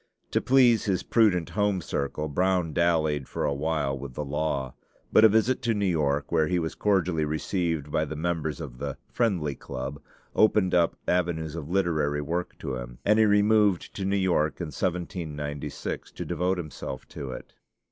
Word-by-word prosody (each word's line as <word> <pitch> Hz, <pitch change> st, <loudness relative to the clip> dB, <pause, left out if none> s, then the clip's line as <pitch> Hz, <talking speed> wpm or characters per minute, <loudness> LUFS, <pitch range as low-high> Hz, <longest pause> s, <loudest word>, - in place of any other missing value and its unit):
To -, -, +2 dB
please 125 Hz, -4 st, +4 dB
his 95 Hz, -3 st, 0 dB
prudent 90 Hz, -7 st, +2 dB
home 100 Hz, +1 st, +1 dB
circle, 75 Hz, -1 st, -3 dB
Brown 90 Hz, +1 st, +1 dB
dallied 80 Hz, -5 st, +1 dB
for -, -, -2 dB
a 70 Hz, -, +1 dB
while 75 Hz, -1 st, -1 dB
with 70 Hz, -1 st, -8 dB
the 75 Hz, -, -3 dB
law; 70 Hz, -3 st, -2 dB, 0.4 s
but -, -, +7 dB
a 110 Hz, -, +9 dB
visit 110 Hz, +4 st, +2 dB
to 115 Hz, -1 st, +1 dB
New 100 Hz, -1 st, 0 dB
York, 75 Hz, -5 st, 0 dB
where 80 Hz, -2 st, +3 dB
he 90 Hz, -, +1 dB
was 80 Hz, -2 st, -2 dB
cordially 90 Hz, -6 st, +1 dB
received 80 Hz, -1 st, -1 dB
by 80 Hz, -, +1 dB
the 80 Hz, -, -6 dB
members 80 Hz, -2 st, -2 dB
of 60 Hz, 0 st, -8 dB
the 70 Hz, -1 st, -4 dB
"Friendly 90 Hz, -11 st, 0 dB
Club," 70 Hz, +1 st, -6 dB, 0.3 s
opened 105 Hz, -3 st, +4 dB
up 85 Hz, -2 st, +3 dB
avenues 85 Hz, -3 st, 0 dB
of 80 Hz, -2 st, -6 dB
literary 80 Hz, -6 st, +1 dB
work 85 Hz, +4 st, -3 dB
to 65 Hz, -2 st, -4 dB
him, -, -, -8 dB
and 105 Hz, +2 st, +4 dB
he 110 Hz, -, +6 dB
removed 105 Hz, -2 st, +3 dB
to 100 Hz, -, -3 dB
New 100 Hz, +1 st, +1 dB
York 85 Hz, -5 st, +1 dB
in 85 Hz, -3 st, -3 dB
1796 75 Hz, -5 st, -4 dB
to -, -, -5 dB
devote 90 Hz, +1 st, 0 dB
himself 75 Hz, -5 st, -6 dB
to 70 Hz, -, -6 dB
it. -, -, -8 dB
80 Hz, 180 wpm, -27 LUFS, 75-95 Hz, 0.4 s, a